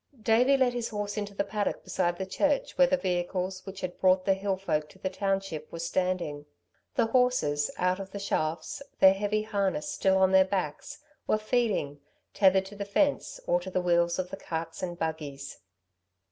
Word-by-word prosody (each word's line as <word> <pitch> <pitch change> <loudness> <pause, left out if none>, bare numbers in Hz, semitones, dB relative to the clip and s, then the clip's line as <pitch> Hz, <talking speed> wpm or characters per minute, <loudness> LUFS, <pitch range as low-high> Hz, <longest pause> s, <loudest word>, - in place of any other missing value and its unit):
Davey 250 +5 +4
led 255 -2 +2
his 240 -1 -2
horse 205 -1 -3
into 205 -1 -4
the - - +1
paddock 205 +1 -2
beside 175 -2 -1
the 190 - -3
church 285 +9 0
where 270 - +5
the 275 - +2
vehicles 185 -1 -2
which 195 0 -7
had 180 -1 -5
brought 185 0 +4
the 195 - +4
hill 195 0 -1
folk 155 -5 -1
to - - -17
the 190 0 -3
township 195 -6 -2
were - - -6
standing. 170 -4 -2 0.5
The - - +3
horses 225 - +2
out 180 +1 +1
of 195 -1 -6
the 200 - -7
shafts, 160 - -2 0.2
their 190 0 +8
heavy 205 +2 -1
harness 200 -7 -1
still 190 0 +2
on 190 0 +4
their 190 0 +7
backs, 185 -6 -3 0.3
were - - +3
feeding, 215 - 0 0.3
tethered 190 -1 +4
to 200 +2 -10
the 200 - -4
fence, 275 +8 0
or 175 - +2
to 180 +2 -7
the 185 - 0
wheels 170 -1 +2
of 185 -1 -3
the 195 - -5
carts 165 -2 -5
and 175 -2 -4
buggies. 150 -4 -5
190 Hz, 190 wpm, -28 LUFS, 175-205 Hz, 0.5 s, their